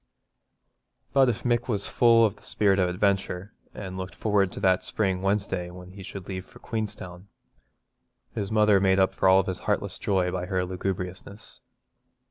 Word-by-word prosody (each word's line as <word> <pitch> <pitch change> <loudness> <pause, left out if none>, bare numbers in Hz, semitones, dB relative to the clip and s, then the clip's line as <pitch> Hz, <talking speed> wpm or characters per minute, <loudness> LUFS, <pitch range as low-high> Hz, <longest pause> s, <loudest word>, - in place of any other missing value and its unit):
But 135 -2 +5
if 115 - -3
Mick 120 -1 +1
was 105 -5 -1
full 115 -1 +5
of 105 -1 -1
the 100 - -22
spirit 100 -2 +2
of 90 -1 +2
adventure, 95 0 -1 0.2
and 95 -2 -7
looked 95 -1 -6
forward 100 -3 +1
to - - -6
that 95 -2 +3
spring 95 -4 -1
Wednesday 95 -2 -1
when 90 +1 -11
he 95 +1 -11
should 95 0 -8
leave 95 -1 -5
for - - -16
Queenstown, 100 -5 -6 1.1
his 100 0 -3
mother 105 -2 +4
made 95 0 +3
up 95 -1 +3
for 95 0 +4
his 95 -2 -3
heartless - - -1
joy 95 -3 +1
by 90 -1 -3
her 95 -2 0
lugubriousness. 95 +2 -5
95 Hz, 165 wpm, -26 LUFS, 95-105 Hz, 1.1 s, But